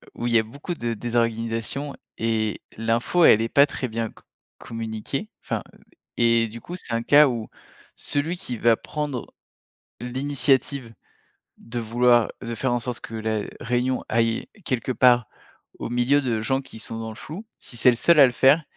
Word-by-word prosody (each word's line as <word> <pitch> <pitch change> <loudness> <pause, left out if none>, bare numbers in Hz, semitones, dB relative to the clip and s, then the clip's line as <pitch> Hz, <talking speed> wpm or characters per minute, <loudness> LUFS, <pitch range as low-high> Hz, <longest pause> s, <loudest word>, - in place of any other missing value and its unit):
où 120 - -4
il 120 - 0
y 115 - +7
a - - +1
beaucoup 140 +10 -6
de 120 -7 -3
désorganisations 115 +4 -2 0.2
et 110 -2 -1 0.2
l'info 115 +10 +2
elle 110 - +7
est 115 - -1
pas 140 +3 +6
très 135 -3 -4
bien 115 0 -2
co - - -19 0.3
communiquée 115 - -5
enfin, - - -3
heu - - -21 0.4
et 115 -1 +3
du 115 +2 -10
coup, 175 - -7
c'est 145 -9 -5
un 115 - +1
cas 145 +4 +7
où 115 -4 -3 0.5
celui 160 +5 0
qui 125 -9 -5
va 115 0 +4
prendre 150 -5 -5 0.7
l'initiative 130 -1 0 0.6
de 120 +1 -6
vouloir 120 0 +3
de 115 -1 -4
faire 130 +3 -1
en 120 - +1
sorte 120 0 -4
que - - -9
la 110 -1 -1 0.2
réunion 125 +2 0
aille 115 0 +1 0.2
quelque 130 -1 -1
part 125 -3 +4 0.5
au - - -4
milieu 125 +4 +3
de 120 -5 -1
gens 130 +4 0
qui 120 -4 -12
sont 115 0 -6
dans 110 0 -5
le 110 - -8
flou, 170 - -8
si - - -5
c'est 125 - +6
le 125 - +3
seul 170 +5 +5
à 140 - +10
le 125 - +1
faire, 135 +6 +4
120 Hz, 185 wpm, -24 LUFS, 115-135 Hz, 0.7 s, à